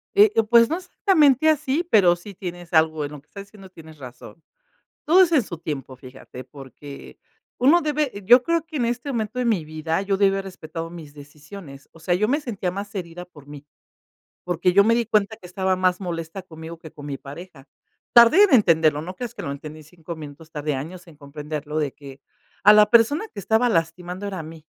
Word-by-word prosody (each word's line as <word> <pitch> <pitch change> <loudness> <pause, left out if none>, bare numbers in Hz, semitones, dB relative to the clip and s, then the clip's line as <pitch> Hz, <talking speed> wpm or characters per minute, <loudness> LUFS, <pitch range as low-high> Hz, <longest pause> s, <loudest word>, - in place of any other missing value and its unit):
Eh 410 +1 +6
eh, 225 - +3
pues 230 +1 +4
no 330 - -1
exactamente 315 - +2
así, 300 +1 0
pero 185 - +5
si 185 +4 -12
tienes 175 -1 -8
algo 160 -1 +2
en 145 - -8
lo 150 - -10
que 150 - -40
estás 200 -1 -10
diciendo, 200 -2 -15
tienes 160 -3 -15
razón. 125 +5 -12 0.6
Todo 365 +4 +6
es 340 - 0
en 295 -7 +3
su 175 -4 -8
tiempo, 140 -5 -6
fíjate, 130 0 -12
porque 140 +2 -12 0.4
uno 295 +8 +4
debe 300 -3 -1
yo 240 +5 +7
creo 335 +2 0
que 315 -2 -7
en 240 - 0
este 245 +4 -3
momento 225 0 -3
de 250 - -1
mi 205 -9 0
vida, 155 +3 -3
yo 195 0 -1
debí 195 0 +3
haber 195 0 -3
respetado 165 -3 -8
mis 165 -4 -11
decisiones. 145 0 -13
O 165 - -18
sea, 175 +2 -1
yo 210 +4 +1
me 280 +6 +1
sentía 205 - -4
más 200 +3 -7
herida 175 -1 -7
por 145 -5 -18
mí. 145 0 -11 0.8
Porque 180 +1 0
yo 200 +2 +5
me 230 +2 +3
di 235 0 +1
cuenta 215 0 0
que 180 - -14
estaba 185 +1 -1
más 185 0 +1
molesta 170 0 -6
conmigo 160 -1 -11
que 160 -1 -12
con 145 -1 -12
mi 140 -2 -5
pareja. 145 0 -12 0.5
Tardé 235 - +7
en 395 - +3
entenderlo, 160 - +3
no 180 +3 -7
creas 235 +3 -7
que - - -8
lo 140 - -4
entendí 155 +2 -9
en - - -16
5 165 +1 -10
minutos, 155 +1 -11
tardé 150 -1 -3
años 175 +7 -7
en 165 -3 -16
comprenderlo 150 +1 -6
de 145 -3 -2
que 140 -2 -13 0.4
a 210 - +9
la 210 0 +5
persona 240 - +3
que - - -12
estaba 220 +5 +1
lastimando 180 +1 -2
era 195 -2 -5
a - - -5
mí. 160 0 -12
180 Hz, 220 wpm, -22 LUFS, 155-220 Hz, 0.8 s, a